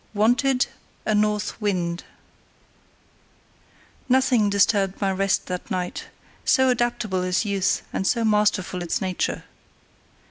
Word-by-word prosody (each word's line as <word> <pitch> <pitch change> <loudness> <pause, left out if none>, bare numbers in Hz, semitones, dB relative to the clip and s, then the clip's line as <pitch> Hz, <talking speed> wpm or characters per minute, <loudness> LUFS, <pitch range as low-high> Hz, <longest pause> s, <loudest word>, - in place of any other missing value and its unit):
Wanted, 250 +5 +3 0.4
a 215 - +1
North 210 +1 0
Wind 180 -4 -1 2.0
Nothing 250 -4 +3
disturbed 200 -1 +2
my 195 -2 +1
rest 195 +1 0
that 180 +2 -5
night, 180 -3 -3 0.4
so 260 -1 +4
adaptable 240 -6 0
is 180 +4 0
youth 200 -2 0
and 190 - -1
so 230 -2 +1
masterful 210 -4 +1
is 175 - -1
nature. 185 -3 -2
205 Hz, 110 wpm, -23 LUFS, 185-225 Hz, 2.0 s, so